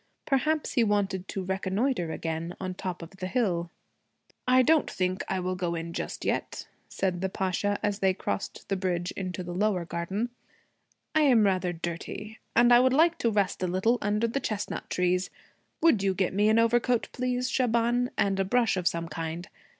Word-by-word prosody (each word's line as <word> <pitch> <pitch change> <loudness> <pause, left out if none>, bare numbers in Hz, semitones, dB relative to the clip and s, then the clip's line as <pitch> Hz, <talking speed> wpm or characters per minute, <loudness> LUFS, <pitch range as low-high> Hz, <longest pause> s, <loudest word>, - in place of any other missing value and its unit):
Perhaps 300 +3 +1
he 245 - +3
wanted 195 -3 0
to 195 - -4
reconnoitre 190 0 -1
again 165 +2 -4
on 185 -1 -3
top 180 -2 -5
of 165 - -10
the 185 -1 -4
hill. 185 -7 0 0.8
'I 255 0 +6
don't 310 +2 +3
think 185 0 -1
I 190 - 0
will 185 0 -1
go 175 -2 -2
in 165 0 -5
just - - -4
yet,' - - -2 0.2
said 185 -2 -1
the 190 - 0
Pasha 195 +2 -1
as 205 -1 0
they 190 -2 +2
crossed 195 - -4
the 195 - 0
bridge 180 -2 -1
into 185 -1 -4
the 175 0 -6
lower 190 -2 +1
garden. 190 +8 -3 0.8
'I 310 - +4
am 255 -7 +5
rather 185 -2 +1
dirty. 175 +6 -6 0.2
And 240 +1 +6
I 240 - +8
would 260 +1 +4
like 330 +4 +4
to 230 - +2
rest 205 -4 0
a 185 - +1
little 190 +7 +1
under 210 +3 +1
the 235 +5 -1
chestnut 215 -6 -4
trees. 180 0 +1 0.5
Would 285 -12 +5
you 195 -1 +1
get 190 0 0
me 205 +2 +3
an 220 - +4
overcoat 235 +1 +2
please, 250 0 -1
Shaban, 240 0 +1
and 195 -1 +1
a - - +3
brush 230 +1 +2
of 180 -1 0
some 170 0 -1
kind? 165 +3 -5
195 Hz, 190 wpm, -28 LUFS, 180-235 Hz, 0.8 s, I